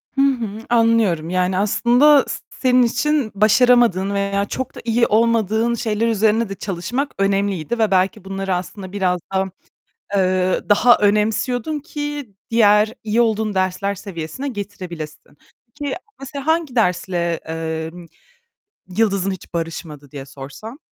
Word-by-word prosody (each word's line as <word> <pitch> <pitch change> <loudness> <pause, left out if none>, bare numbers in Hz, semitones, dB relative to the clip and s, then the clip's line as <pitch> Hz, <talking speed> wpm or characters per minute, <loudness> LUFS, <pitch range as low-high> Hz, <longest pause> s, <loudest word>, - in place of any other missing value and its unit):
Hı 275 - +2
hı. 230 -5 0
Anlıyorum. 225 -9 +2
Yani, 185 +1 0
aslında 245 +8 +4
s - - -4 0.2
senin 255 -1 +5
için 280 0 0
başaramadığın 215 -2 +4
veya 200 0 0
çok 260 +5 -5
da - - -8
iyi 235 0 +2
olmadığın 225 +1 +2
şeyler 225 -1 -1
üzerine 220 0 +2
de 195 - -5
çalışmak 200 +9 -3
önemliydi 195 0 0
ve 220 -3 +2
belki 190 +2 +1
bunları 195 -1 -2
aslında 185 +1 -6
biraz 185 -3 0
daha, 190 0 0 0.7
eee, 185 -1 +1
daha 235 +4 +6
önemsiyordun 220 +7 +1
ki 290 - -6 0.2
diğer 215 -1 +4
iyi 220 +2 +2
olduğun 220 -2 0
dersler 190 +1 -1
seviyesine 190 - -6
getirebilesin. 185 - -7 0.4
Peki, 285 -2 -2 0.2
mesela 275 +1 -7
hangi 320 -5 +1
dersle, 180 -5 0
eee, 160 0 -4 1.1
yıldızın 200 -3 +2
hiç 190 - -9
barışmadı 160 -4 -5
diye 140 -2 -7
sorsam? 140 - -10
210 Hz, 130 wpm, -20 LUFS, 185-235 Hz, 1.1 s, daha